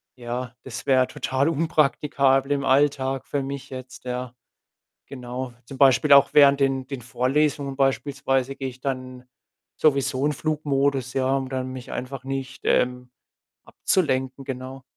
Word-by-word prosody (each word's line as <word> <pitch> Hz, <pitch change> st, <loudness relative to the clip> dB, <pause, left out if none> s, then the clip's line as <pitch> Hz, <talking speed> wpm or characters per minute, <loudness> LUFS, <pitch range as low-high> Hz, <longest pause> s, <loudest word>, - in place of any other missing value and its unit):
ja, 125 Hz, 0 st, -5 dB
das 125 Hz, -2 st, -7 dB
wäre 130 Hz, -1 st, +4 dB
total 135 Hz, +4 st, -1 dB
unpraktikabel 145 Hz, -3 st, +2 dB
im 140 Hz, -1 st, -2 dB
Alltag 135 Hz, -1 st, +2 dB
für 145 Hz, -, -1 dB
mich 140 Hz, 0 st, -6 dB
jetzt, 130 Hz, 0 st, -9 dB
ja. 125 Hz, -1 st, -4 dB, 0.7 s
Genau. 125 Hz, -1 st, -6 dB
Zum 135 Hz, -, -10 dB
Beispiel 140 Hz, +1 st, +5 dB
auch 140 Hz, 0 st, +7 dB
während 140 Hz, -1 st, +6 dB
den 135 Hz, -1 st, +1 dB
den 135 Hz, -3 st, -6 dB
Vorlesungen 135 Hz, +4 st, 0 dB
beispielsweise 135 Hz, -1 st, 0 dB
gehe 135 Hz, -1 st, -4 dB
ich 130 Hz, 0 st, -14 dB
dann 130 Hz, -2 st, -5 dB, 0.6 s
sowieso 140 Hz, -2 st, +2 dB
in 150 Hz, -, +1 dB
Flugmodus, 140 Hz, -4 st, -1 dB
ja, 135 Hz, 0 st, +1 dB
um 135 Hz, -1 st, -3 dB
dann 130 Hz, -1 st, -3 dB
mich 130 Hz, -1 st, -8 dB
einfach 130 Hz, +1 st, -5 dB
nicht, 135 Hz, 0 st, -5 dB
ähm, 125 Hz, 0 st, +1 dB, 0.6 s
abzulenken. 135 Hz, -6 st, -1 dB
Genau. 130 Hz, +1 st, -6 dB
135 Hz, 140 wpm, -24 LUFS, 130-140 Hz, 0.7 s, auch